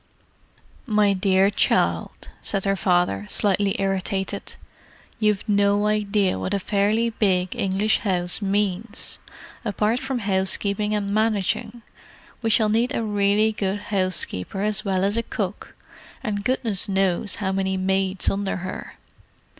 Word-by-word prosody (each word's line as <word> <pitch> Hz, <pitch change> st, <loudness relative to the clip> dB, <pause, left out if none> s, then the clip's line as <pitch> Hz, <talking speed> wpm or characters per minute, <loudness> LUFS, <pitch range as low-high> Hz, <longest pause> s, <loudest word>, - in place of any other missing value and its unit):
"My 210 Hz, -3 st, +3 dB
dear 190 Hz, +1 st, +3 dB
child," -, -, 0 dB
said 195 Hz, -1 st, -2 dB
her 195 Hz, 0 st, +2 dB
father, 175 Hz, -, +1 dB
slightly 200 Hz, -1 st, +1 dB
irritated—"you've 195 Hz, +2 st, -3 dB
no 205 Hz, 0 st, +3 dB
idea 210 Hz, -2 st, +1 dB
of -, -, -4 dB
what 190 Hz, -, -1 dB
a -, -, 0 dB
fairly 210 Hz, +4 st, +1 dB
big 185 Hz, -2 st, +1 dB
English 205 Hz, -1 st, +1 dB
house 180 Hz, -2 st, -1 dB
means, 205 Hz, +2 st, -1 dB, 0.4 s
apart 215 Hz, +2 st, 0 dB
from 265 Hz, -1 st, -3 dB
housekeeping 200 Hz, 0 st, 0 dB
and 200 Hz, -1 st, -2 dB
managing. 215 Hz, +1 st, 0 dB, 0.6 s
We 225 Hz, -, 0 dB
shall 215 Hz, -1 st, +4 dB
need 235 Hz, +6 st, +1 dB
a 230 Hz, -, -1 dB
really 205 Hz, +1 st, +2 dB
good 200 Hz, -1 st, -2 dB
housekeeper 185 Hz, -, -1 dB
as 215 Hz, 0 st, -1 dB
well 190 Hz, -3 st, 0 dB
as 200 Hz, +3 st, +1 dB
a -, -, +2 dB
cook; 205 Hz, -3 st, -5 dB, 0.5 s
and 205 Hz, -4 st, -2 dB
goodness 220 Hz, -4 st, 0 dB
knows 190 Hz, 0 st, +1 dB
how 190 Hz, -2 st, -2 dB
many 190 Hz, 0 st, 0 dB
maids 190 Hz, 0 st, 0 dB
under 195 Hz, 0 st, 0 dB
her. 185 Hz, 0 st, -6 dB
200 Hz, 130 wpm, -23 LUFS, 190-215 Hz, 0.6 s, shall